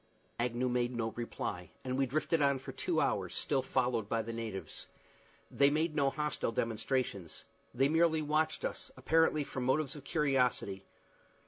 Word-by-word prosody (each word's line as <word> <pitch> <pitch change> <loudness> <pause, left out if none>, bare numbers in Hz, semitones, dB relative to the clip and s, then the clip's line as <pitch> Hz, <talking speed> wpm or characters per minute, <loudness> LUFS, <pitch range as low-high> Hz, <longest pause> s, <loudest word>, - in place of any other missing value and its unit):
Agnew 120 +1 0
made 125 0 0
no 115 -1 -1
reply, 100 -6 -4 0.2
and 130 0 -1
we 135 0 +2
drifted 155 +4 +1
on 140 -1 +4
for 130 - -8
two - - 0
hours, - - 0
still 135 -3 +1
followed 125 -5 0
by 115 -1 +1
the 115 +1 -5
natives. 110 -4 -5 0.6
They 140 0 +5
made 155 +2 0
no 140 -2 +3
hostile 150 -4 -1
demonstrations. 115 - -2 0.3
They 135 +2 +3
merely 160 0 +3
watched 155 +1 +1
us, - - -3
apparently 160 -2 +3
from 130 -2 -4
motives 140 +4 +1
of 145 - -9
curiosity. 125 - +1
130 Hz, 155 wpm, -33 LUFS, 115-150 Hz, 0.6 s, They